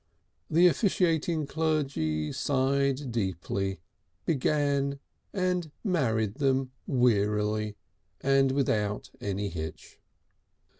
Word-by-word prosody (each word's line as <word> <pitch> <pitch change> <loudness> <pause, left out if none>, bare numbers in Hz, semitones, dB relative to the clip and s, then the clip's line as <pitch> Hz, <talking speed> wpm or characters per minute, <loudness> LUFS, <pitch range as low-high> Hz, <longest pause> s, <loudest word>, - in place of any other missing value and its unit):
The 170 +3 +5
officiating 170 -4 +2
clergy 140 - 0
sighed 135 0 +1
deeply, 95 -2 -2 0.4
began, 140 -2 +1 0.3
and 180 -4 0
married 115 - +1
them 135 -2 +1 0.2
wearily 105 -3 +1 0.4
and 135 0 +3
without 105 -6 0
any 100 0 -2
hitch. 80 -3 -7
135 Hz, 80 wpm, -29 LUFS, 105-150 Hz, 0.4 s, The